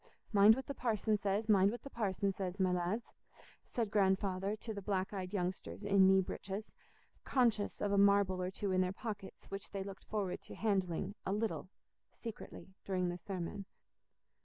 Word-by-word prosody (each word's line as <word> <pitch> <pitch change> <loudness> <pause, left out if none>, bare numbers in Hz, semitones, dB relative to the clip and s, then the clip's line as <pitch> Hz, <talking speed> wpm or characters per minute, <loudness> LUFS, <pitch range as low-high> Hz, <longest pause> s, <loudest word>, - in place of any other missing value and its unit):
"Mind 205 +2 +8
what 265 - -5
the 280 - -4
parson 220 -4 +1
says, 205 +2 0
mind 200 -2 +6
what 240 +3 -5
the 275 - -7
parson 200 -3 0
says, 190 0 -4
my 185 -1 +3
lads," 180 +6 0 0.6
said 225 -4 -2
Grandfather 195 0 +2
to 220 +1 -6
the 200 - -5
black 190 0 -1
eyed 185 -2 -4
youngsters 185 +1 -3
in 200 -2 +5
knee 190 0 +6
breeches, 195 +3 -5 0.5
conscious 230 -6 +2
of 205 - +1
a 200 - +4
marble 200 -2 +4
or 180 - -1
two 195 +1 -3
in 185 0 +3
their 185 0 +1
pockets 205 -2 -7
which 195 +1 -5
they 195 -1 -3
looked 195 0 -9
forward 195 -4 -2
to - - -10
handling, 195 -3 0
a - - -2
little, 210 -2 -1 0.4
secretly, 220 -4 -8
during 185 -2 0
the 175 - -3
sermon. 195 +2 -5
200 Hz, 180 wpm, -35 LUFS, 190-210 Hz, 0.6 s, Mind